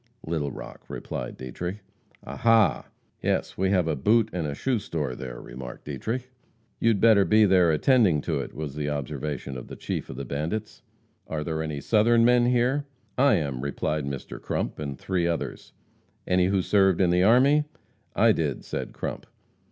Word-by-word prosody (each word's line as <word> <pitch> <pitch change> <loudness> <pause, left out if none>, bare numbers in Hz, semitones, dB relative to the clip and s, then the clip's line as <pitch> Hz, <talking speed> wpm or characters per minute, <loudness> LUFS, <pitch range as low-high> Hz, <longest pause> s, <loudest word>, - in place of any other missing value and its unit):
"Little 80 -3 -2
Rock," - - -9
replied - - -5
Dietrich. 85 +10 -5 0.5
"Ah, - - -7
ha!" 115 -2 +3 0.3
"Yes, - - 0
have 95 -2 +1
a 80 - 0
boot 110 - +2
and 75 -5 -3
shoe 130 -4 0
store 75 -9 -3
there," - - -7
remarked 60 0 -9
Dietrich. 125 +3 -4 0.5
"You'd 115 -3 +3
better 110 -2 +6
be 110 +2 +5
there 90 -3 +4
attending 95 - +4
to 80 -2 -2
it," 70 - -6
was 75 -2 -5
the 75 0 -3
observation 70 -1 -4
of 60 - -8
the - - -8
chief - - -4
of - - -7
the 70 - -5
bandits. 80 - -4 0.5
"Are 75 -1 -3
there 80 0 -2
any 75 -3 -4
Southern 115 +1 +4
men 120 0 +4
here?" 125 +4 +2 0.3
"I 135 -2 +4
am," 70 -7 -2
replied 70 +1 -2
Mr. 70 -2 -6
Crump - - -3
and 70 -3 -4
three 90 -3 -1
others. 85 -1 -4 0.5
"Any 90 0 +3
who 95 -1 +1
served 95 -3 +3
in 90 -2 +3
the 90 +1 +3
army?" 135 +9 +5 0.5
"I - - +5
did," - - -2
said - - -5
Crump. - - -5
90 Hz, 170 wpm, -26 LUFS, 75-110 Hz, 0.5 s, better